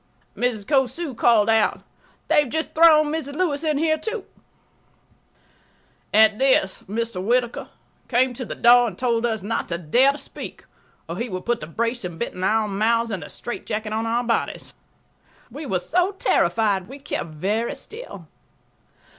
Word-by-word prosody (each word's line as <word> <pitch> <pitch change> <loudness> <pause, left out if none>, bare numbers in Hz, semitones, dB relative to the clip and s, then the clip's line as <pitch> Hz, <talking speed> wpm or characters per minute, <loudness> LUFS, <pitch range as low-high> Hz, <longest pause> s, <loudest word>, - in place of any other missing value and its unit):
Mrs. 235 -5 -1
Cosu 270 +4 0
called 225 -2 +4
out, 225 -1 +2 0.5
"They - - +4
have 285 - -4
just 315 +3 -3
thrown 310 -2 +6
Mrs. 285 -3 -4
Lewis 305 -4 0
in 305 -2 +1
here, 315 +1 +1
too." 440 +3 -4 1.9
At 215 0 +5
this 260 -8 +2
Mr. 225 -3 -3
Whittaker 240 +2 0 0.4
came 255 +1 +2
to 255 - -6
the - - -6
door 240 0 +6
and 190 -5 -7
told 235 -2 +1
us 220 -4 -3
not 225 +3 -2
to 170 - -3
dare 245 - +3
to - - -8
speak, - - -9 0.4
or - - -5
he 235 +1 -3
would 185 -2 -5
put 240 0 0
the 150 - -7
brace 230 +7 -2
and 175 -2 -6
bit 235 - -3
in 180 - -6
our 215 +2 +2
mouths 230 +3 +1
and 190 -4 -3
the - - -9
straitjacket 215 -2 -5
on 225 +1 -1
our 235 +2 0
bodies. 230 -1 -2 0.8
We 290 +4 -7
were 190 - +1
so 355 - 0
terrified 210 - +1
we 270 - -9
kept 280 - -4
very 210 +8 -1
still. 315 - -10
235 Hz, 170 wpm, -23 LUFS, 215-280 Hz, 1.9 s, thrown